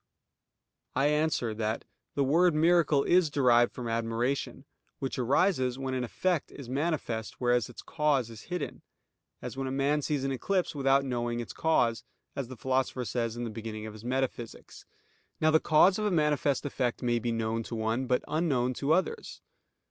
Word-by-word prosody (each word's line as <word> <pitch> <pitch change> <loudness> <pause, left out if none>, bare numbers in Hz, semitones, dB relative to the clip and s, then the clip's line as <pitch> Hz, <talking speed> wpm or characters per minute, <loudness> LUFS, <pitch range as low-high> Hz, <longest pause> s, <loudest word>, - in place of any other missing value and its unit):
I 145 - +3
answer 150 -7 +1
that, 110 0 -2 0.3
The 140 - +2
word 165 +5 +3
miracle 160 -3 +4
is 175 -3 +4
derived 120 -4 +4
from 125 -2 -6
admiration, 115 +4 -2 0.3
which 135 -1 -4
arises 130 0 +2
when 135 -1 -3
an 130 -1 -1
effect 175 +6 -1
is 140 -4 -10
manifest, 135 -5 -2
whereas 120 -1 +2
its 120 - -11
cause 145 -7 0
is 115 - -11
hidden; 180 -1 -4 0.6
as - - -5
when 135 0 -2
a - - -3
man 140 +2 +1
sees 145 -1 -1
an 135 - -1
eclipse 180 +8 -1
without 135 -1 +2
knowing 120 -2 -2
its 120 - -6
cause, 115 -8 +1 0.3
as 140 -3 -3
the 130 0 -9
Philosopher 130 0 -1
says 115 +2 -2
in 120 - -3
the 115 - -4
beginning 110 -1 -6
of 110 - -7
his 110 0 -12
Metaphysics. 125 -2 -4 0.5
Now 155 0 +3
the 160 - +5
cause 180 +7 +4
of 210 - -1
a - - +2
manifest 150 -5 +1
effect 125 -4 -2
may 120 -1 +1
be 120 0 -2
known 115 0 -1
to 115 - -6
one, 115 +4 -1
but 125 -1 +1
unknown 135 -6 +1
to 140 +5 +1
others. 190 - -2
130 Hz, 180 wpm, -29 LUFS, 120-150 Hz, 0.6 s, the